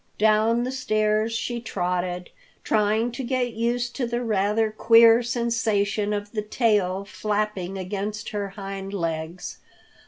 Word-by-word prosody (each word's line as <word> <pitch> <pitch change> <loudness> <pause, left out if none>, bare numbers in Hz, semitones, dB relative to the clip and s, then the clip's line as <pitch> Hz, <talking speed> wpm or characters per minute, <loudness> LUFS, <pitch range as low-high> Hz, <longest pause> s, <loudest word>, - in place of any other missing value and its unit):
Down 220 +2 +3
the 255 - -2
stairs 215 -3 +1
she 235 +1 -3
trotted, 180 -4 -2 0.3
trying 215 +2 +1
to 245 +3 -5
get 250 -1 -1
used 240 +1 -1
to 250 -3 -1
the 240 +1 -2
rather 215 0 +1
queer 230 +1 +6
sensation 225 -4 0
of 205 0 -3
the 215 - -2
tail 205 -4 +1
flapping 200 -1 -2
against 200 +3 -4
her 205 -2 -3
hind 195 0 -6
legs. 165 0 -4
215 Hz, 130 wpm, -24 LUFS, 195-230 Hz, 0.3 s, queer